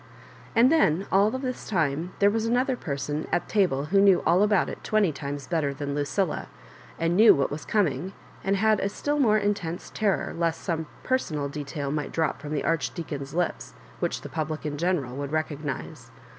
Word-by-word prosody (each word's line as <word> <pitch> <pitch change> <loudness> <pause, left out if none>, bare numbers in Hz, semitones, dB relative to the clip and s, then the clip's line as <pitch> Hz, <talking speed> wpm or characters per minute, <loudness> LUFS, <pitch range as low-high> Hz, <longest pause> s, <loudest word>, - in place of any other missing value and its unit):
And 240 +4 +6
then 195 - +3
all 200 +2 +5
this 255 +1 -4
time 165 -2 0
there 200 0 +4
was 225 +1 0
another 250 +3 +2
person 145 - -3
at - - 0
table 175 -10 +1
who 195 - +6
knew 195 -2 +5
all 180 +3 +4
about 210 -2 +3
it - - -7
twenty 215 -5 +2
times 140 -1 -5
better 150 -5 -1
than 140 0 -3
LucUla, 150 +4 -1 0.5
and 165 +1 +1
knew 220 +4 +8
what 140 0 0
was 150 +2 -5
coming, 185 - 0 0.3
and 195 +1 +1
had 215 +1 +3
a 195 - 0
still 290 +8 -2
more 215 -6 +4
intense 200 -5 -2
terror 210 -3 0
lest 165 -1 -1
some 160 -4 -2 0.2
personal 155 - -1
detail 140 -1 -4
might 150 -1 -2
drop 160 -2 -1
from 150 - -7
the - - -1
Arch 150 -6 0
deacon's 145 -3 -5
lips 175 0 -2 0.2
which - - -1
the - - -7
public 155 -1 -3
in 150 -1 -2
general 150 -6 -1
would 140 0 -4
recognise. 150 -3 -4
165 Hz, 185 wpm, -26 LUFS, 145-205 Hz, 0.5 s, knew